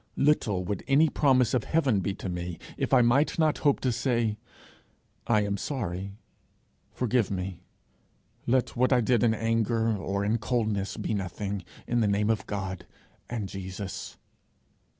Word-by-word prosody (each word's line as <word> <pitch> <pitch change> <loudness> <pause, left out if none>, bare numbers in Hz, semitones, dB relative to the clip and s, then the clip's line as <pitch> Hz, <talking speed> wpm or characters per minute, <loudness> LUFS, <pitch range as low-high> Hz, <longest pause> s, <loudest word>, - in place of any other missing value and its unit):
Little 110 -10 +2
would 100 0 -3
any 145 +3 +5
promise 130 -5 +3
of 125 -4 +2
heaven 140 -10 +2
be 95 +1 -2
to 100 - -6
me 90 -1 -4 0.2
if - - -2
I 125 -2 +6
might 135 +6 +3
not 155 -2 +2
hope 145 -2 +3
to 130 - +1
say, 120 -3 0 0.9
'I 110 -3 +4
am 100 0 -1
sorry; 100 - -4 0.7
forgive 125 -3 +1
me; 90 -2 -4 0.9
let 130 +1 +1
what 130 +2 +2
I 125 - +5
did 120 0 +2
in 115 -2 +3
anger 115 0 +1
or 100 0 -2
in 110 +3 +1
coldness 110 -4 -1
be - - -2
nothing, 100 0 -3 0.2
in 120 - 0
the 110 - +3
name 105 +2 +2
of 110 - -2
God 95 -3 -4 0.4
and 115 -5 -3
Jesus!' 95 0 -6
110 Hz, 155 wpm, -28 LUFS, 100-125 Hz, 0.9 s, I